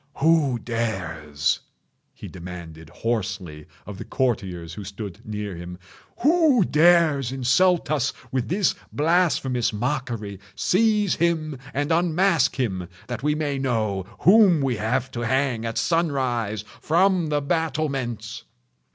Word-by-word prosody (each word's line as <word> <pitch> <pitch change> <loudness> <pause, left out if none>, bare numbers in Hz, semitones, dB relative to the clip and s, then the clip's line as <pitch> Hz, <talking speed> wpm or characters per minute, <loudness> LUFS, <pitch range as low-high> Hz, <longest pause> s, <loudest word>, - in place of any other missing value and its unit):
"Who 155 -4 +3
dares?" 90 -11 -2 0.6
he - - -9
demanded 85 -3 -9
hoarsely 95 -7 -3 0.2
of 100 -1 -8
the - - -5
courtiers 95 -10 -2
who 105 - -7
stood 100 -1 -8
near 105 -3 -4
him—"who 235 - 0
dares 155 -5 +4
insult 150 +7 +2
us 140 -4 +1 0.2
with 130 -2 -1
this 190 +3 +2 0.2
blasphemous 150 -6 +1
mockery? 115 -4 -3 0.2
Seize 210 -1 +2
him 155 -5 0
and 145 +3 -1
unmask 170 -4 +2
him—that 95 -1 -4
we 150 +1 +1
may 145 -3 -2
know 110 -7 -1
whom 190 -3 +6
we 130 -4 0
have 115 +4 -1
to 120 - -5
hang 120 -1 0
at 115 - -4
sunrise, 130 - 0 0.2
from 180 +1 +2
the 150 -1 +1
battlements!" 140 -7 -2
130 Hz, 115 wpm, -24 LUFS, 105-160 Hz, 0.6 s, whom